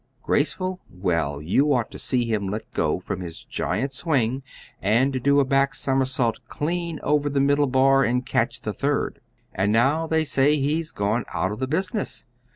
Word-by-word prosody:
Graceful? 185 +5 0
Well, 85 -6 -1
you 135 - +2
ought 120 -3 -1
to - - -8
see 125 -2 0
him 105 -4 -1
let 105 +3 -6
go - - 0
from - - -5
his 85 -3 -7
giant 135 +4 -2
swing 130 -4 0 0.4
and 130 +6 +2
do 140 +2 +4
a 140 - +3
back 135 +2 +2
somersault 130 -4 0
clean 170 +1 -3
over 145 -1 +2
the 140 -1 0
middle 145 +1 +3
bar 135 +1 +4
and 125 0 0
catch - - 0
the - - -3
third! - - -1 0.3
And 95 +2 +1
now 140 +9 +2
they 160 0 +2
say 145 +1 +3
he's 155 +3 0
gone 105 +1 -1
out 95 - 0
of 105 - -5
the 130 - -1
business. 185 - -2
135 Hz, 175 wpm, -24 LUFS, 115-145 Hz, 0.4 s, do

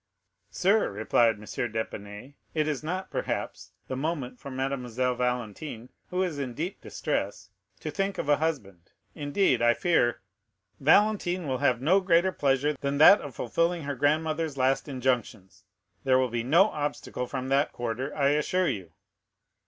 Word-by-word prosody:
"Sir," 200 +4 +2
replied 110 +2 +2
M. 105 - -15
d'Épinay, 110 +1 -5 0.2
"it 155 -1 +1
is 150 -4 -2
not, 185 +4 -4
perhaps, - - -4
the 130 - -3
moment 135 -3 -3
for - - -8
Mademoiselle 130 -2 -1
Valentine, 125 0 -3 0.2
who 185 +1 0
is 165 -6 -3
in 130 -4 -4
deep 175 +6 -4
distress, - - -3 0.3
to - - -4
think 195 0 -2
of - - -3
a 145 -1 +4
husband; 100 - -4 0.2
indeed, 145 - +1
I 120 0 +4
fear——" 120 -9 +2 0.6
40028m - - -12
"Valentine 190 -5 +3
will 130 -2 -1
have 125 -4 +2
no 175 +8 +4
greater 185 0 +3
pleasure 145 -2 +1
than 140 0 -1
that 195 +7 +8
of 140 -5 -8
fulfilling 165 +7 0
her 145 0 -3
grandmother's 155 +2 0
last 130 +2 +1
injunctions; 125 -7 -2 0.4
there 130 -1 +4
will 130 -1 +2
be 120 0 -1
no 165 - +4
obstacle 145 -4 -4
from 130 0 -4
that 140 +2 +2
quarter, 120 +4 -3
I 140 -1 +3
assure 165 +4 +1
you." 95 -10 -5
140 Hz, 160 wpm, -27 LUFS, 125-160 Hz, 0.6 s, that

